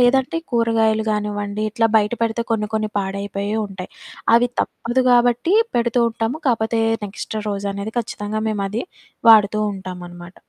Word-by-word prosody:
లేదంటే 265 +6 +3
కూరగాయలు 225 -2 +2
గానివ్వండి, 210 0 -2
ఇట్లా 225 +1 +2
బయట 210 +2 -1
పెడితే 230 0 0
కొన్ని 210 -2 0
కొన్ని 215 -1 -1
పాడైపోయే 200 +1 -3
ఉంటాయి. 190 -2 -8 0.5
అవి 245 +1 +3
తప్పదు 240 +2 -1
గాబట్టీ 245 - +3 0.2
పెడుతూ 235 0 +2
ఉంటాము, 225 +5 -2
కాపోతే 225 -1 +1 0.3
నెక్స్ట్ 205 +2 -6
రోజనేది 200 +2 -4
ఖచ్చితంగా 215 -2 -4
మేమది 210 +2 -2 0.5
వాడుతూ 215 -1 +6
ఉంటామనమాట. 180 -2 -9
215 Hz, 125 wpm, -20 LUFS, 200-235 Hz, 0.5 s, వాడుతూ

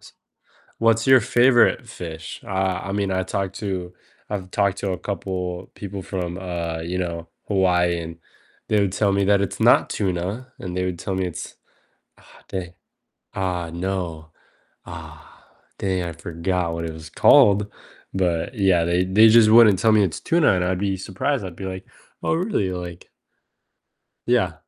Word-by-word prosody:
s - - -16 0.7
what's 115 0 +2
your 130 -1 +8
favorite 120 +3 +3
fish? 80 -2 -8
Uh, 95 -1 -1
I 95 - -4
mean, 100 -1 -1
I 95 0 0
talked 95 0 -3
to 90 -3 -4 0.4
I've 95 -3 -5
talked 100 -1 +1
to 100 - -2
a 90 - -2
couple 90 -2 -4
people 100 -1 -6
from, 90 -2 -4
uh, 85 -3 -4
you 85 +3 -3
know, 85 -2 -4 0.2
Hawaii, 90 -3 +2
and 85 0 -7 0.5
they 105 - +3
would 100 -2 +1
tell 100 0 +2
me 100 0 +1
that 100 0 +3
it's 100 - -3
not - - +5
tuna, 100 +7 -3
and 90 -1 -5
they 90 - 0
would 90 -2 -3
tell 95 0 -3
me 95 - -1
it's 90 - -7 0.6
ah, - - -19
dang. 90 -3 -5 0.6
Ah, 90 -3 -2
no. 85 -3 -4 0.6
Ah, 80 -3 -12 0.3
dang, 95 -2 -1
I 85 -1 -4
forgot 85 +1 -2
what 85 0 -4
it 80 - -5
was 80 0 -10
called, 100 +4 +5 0.4
but 90 +3 -1
yeah, 95 -5 +3
they 85 +2 +1
they 105 +4 +6
just 110 -1 +6
wouldn't 110 -4 +7
tell 110 +4 +3
me 105 -1 +5
it's 90 -6 -1
tuna, 165 - +3
and 90 - 0
I'd 90 0 0
be 100 0 -1
surprised, 100 +7 -2
I'd 90 -3 -7
be 95 - -6
like, 95 0 -6 0.4
"Oh, - - +1
really?" 165 - -1
Like 90 -1 -7 1.2
Yeah. - - +2
95 Hz, 170 wpm, -22 LUFS, 85-100 Hz, 1.2 s, your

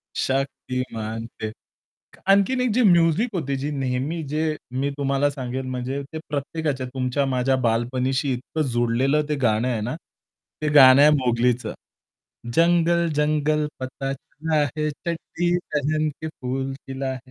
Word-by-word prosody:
शक्तिमान 125 -4 -2 0.2
ते 110 0 -2 0.8
आणखीन 200 +6 +4
एक 250 - +2
जी 250 - +3
म्युझिक 175 +3 +4
होती 140 -6 -1
जी 145 +3 -3
नेहमी 135 +4 -2
जे 155 +1 0 0.3
मी 140 - +1
तुम्हाला 140 +1 +1
सांगेल 130 -1 -4
म्हणजे 130 +2 -3
ते - - -3
प्रत्येकाच्या 145 -2 -2
तुमच्या 130 +2 0
माझ्या 130 0 +1
बालपणीशी 130 +4 0
इतकं 130 +5 -4
जुडलेलं 125 +5 +2
ते 150 - +1
गाणं 110 +1 +2
आहे 115 -4 -1
ना, 120 +7 -3 0.7
ते 155 - 0
गाणं 135 -1 +9
आहे 150 - +8
मोगलीचं. 120 -1 +1 0.8
जंगल, 170 0 +3
जंगल. 150 0 +1
पता 135 +1 -4
चला 155 +3 -2
है 155 0 0
चड्डी 170 +2 -2 0.2
पेहेन 155 +1 +1
के 160 - -4
फूल 130 +1 -2
खिला 135 0 -5
है. 130 0 -12
135 Hz, 140 wpm, -23 LUFS, 130-155 Hz, 0.8 s, गाणं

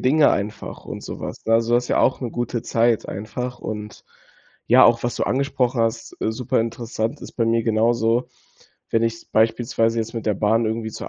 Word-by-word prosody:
Dinge 145 +4 +4
einfach 105 +2 -4
und - - -7
sowas, - - -7
ne, 115 - +4
also, 115 +1 +2
das 120 0 +2
ist - - -9
ja - - +1
auch 130 - +2
'ne 120 -3 -3
gute 120 -1 -3
Zeit 115 -1 +1
einfach. 120 +5 -5
Und, 105 -1 -7 0.6
ja, - - +7
auch 115 0 +4
was 120 - -1
du - - -1
angesprochen 130 -2 0
hast 115 0 -2
äh, 110 - 0
super 120 0 0
interessant, 115 +2 -3
ist - - -9
bei 115 -2 0
mir 115 0 +2
genauso. 115 +2 +2 0.6
Wenn 115 - +2
ich 115 0 -2
beispielsweise 115 +1 +2
jetzt 115 +1 -3
mit 115 -1 -5
der 105 - +2
Bahn 110 +3 +2
irgendwie 110 0 -2
zur - - -7
115 Hz, 200 wpm, -22 LUFS, 110-120 Hz, 0.6 s, ja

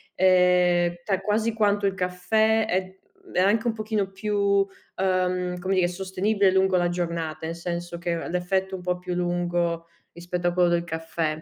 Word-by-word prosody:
ehm, 180 -1 +4
ta 195 -1 0
quasi 215 +3 0
quanto 205 -2 +1
il 195 - +1
caffè 215 +5 +1
è 190 0 -2 0.3
è - - 0
anche 210 +5 +3
un 225 - +1
pochino 215 -3 -2
più, 200 0 +1 0.3
ehm, 185 -1 0
come 185 +2 -2
dire 180 -2 +3
sostenibile 190 +2 +1
lungo 190 0 +3
la 175 -1 +2
giornata, 170 -3 -3
nel 165 - -4
senso 170 0 -5
che 170 0 -2
r - - -5
l'effetto 190 +2 -1
è - - -4
un 180 - -10
po' 180 0 -1
più 180 0 -5
lungo 175 -1 -1 0.3
rispetto 175 +1 -3
a 175 - +1
quello 180 -1 +3
del 170 0 +1
caffè. 160 -1 -3
180 Hz, 180 wpm, -25 LUFS, 175-195 Hz, 0.3 s, ehm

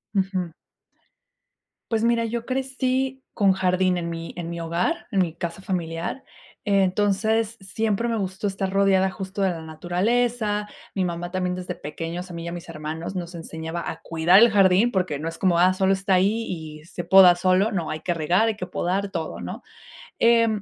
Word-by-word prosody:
Ujú. 190 -3 0 1.4
Pues 225 0 +1
mira, 235 0 +3
yo 230 +1 -3
crecí 265 0 -1
con 200 -2 +4
jardín 185 -1 +1
en 170 -1 -3
mi 165 0 -6
en 170 -1 -4
mi 170 - -5
hogar, 170 - -1
en 195 -4 +2
mi 165 -3 -1
casa 170 +3 -5
familiar. 170 +6 -3 0.4
Entonces 205 +3 +1
siempre 220 +3 -1
me 230 - 0
gustó 190 0 -3
estar 195 -1 -1
rodeada 195 -1 +3
justo 190 +1 -6
de 190 - +3
la 165 -2 -5
naturaleza. 210 +6 0 0.2
Mi 190 - 0
mamá 175 0 -3
también 180 -1 -1
desde 180 0 -5
pequeños 165 +4 -6
a 170 - -7
mí 165 - -6
y - - -6
a - - -4
mis 175 -1 -8
hermanos 160 +3 -5
nos 175 -1 -5
enseñaba 165 0 -5
a - - -7
cuidar 165 +3 +4
el 235 0 +7
jardín 200 +3 +4
porque 180 -7 0
no 160 +3 -5
es 165 0 -6
como, 180 -3 +3
ah, 185 +1 +5
solo 190 +1 +2
está 195 0 0
ahí 205 +5 +2
y 155 -3 -7
se 175 0 -7
poda 190 -2 +8
solo. 185 +4 +2
No 175 -5 -2
hay 155 - -4
que 175 - -1
regar. 175 +8 +2
Hay 215 - -2
que 180 -3 -6
podar 195 +4 -1
todo, 160 -4 -4
¿no?, - - -6 0.6
eh, 230 0 +5
185 Hz, 190 wpm, -24 LUFS, 170-210 Hz, 1.4 s, poda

